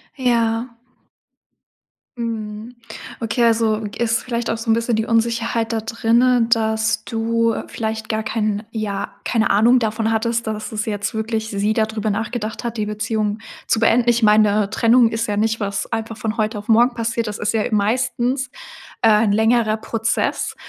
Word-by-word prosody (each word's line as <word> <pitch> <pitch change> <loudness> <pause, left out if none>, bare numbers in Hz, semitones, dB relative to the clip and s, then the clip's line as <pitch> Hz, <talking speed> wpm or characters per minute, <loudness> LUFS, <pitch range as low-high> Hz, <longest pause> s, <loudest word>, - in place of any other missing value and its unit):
Ja. 235 -2 0 1.4
Mhm. 220 0 -5 0.5
Okay 235 +2 0
also, 225 -1 +2
g 205 - -7
ist 225 0 0
vielleicht 235 -1 -3
auch 225 - -1
so 230 0 -6
'n - - +6
bisschen 230 0 0
die 220 0 0
Unsicherheit 230 0 0
da 225 -1 -1
drinnen, 230 +2 +2
dass 220 -1 +1
du 230 0 0
vielleicht 220 0 -4
gar 220 0 -1
keinen 215 -1 -1
ja, 210 -3 -3
keine 225 -2 +1
Ahnung 230 +5 +5
davon 220 -1 0
hattest, 230 +1 -1
dass 215 0 -4
es 215 -1 -3
jetzt 205 0 -2
wirklich 220 0 -2
sie 205 +2 0
da 220 -1 +2
drüber 215 -1 -3
nachgedacht 220 +2 -3
hat 235 -1 -4
die 210 -1 -1
Beziehung 210 0 -2 0.3
zu 220 - +2
beenden. 235 +1 +3
Ich 235 -1 +2
meine 210 -1 +4
Trennung 230 +1 +4
ist 225 0 -2
ja 205 -1 -1
nicht 225 +1 +1
was 200 +1 -3
einfach 225 0 -3
von 220 +1 -3
heute 215 0 -1
auf 205 - -8
morgen 240 +2 +4
passiert, 230 -1 -2
das 210 - -4
ist 210 - -1
ja 220 -2 +1
meistens, 250 +4 0 0.5
äh, 225 - +4 0.2
'n 200 - +2
längerer 220 0 +2
Prozess 225 +1 -1
225 Hz, 170 wpm, -20 LUFS, 215-230 Hz, 1.4 s, n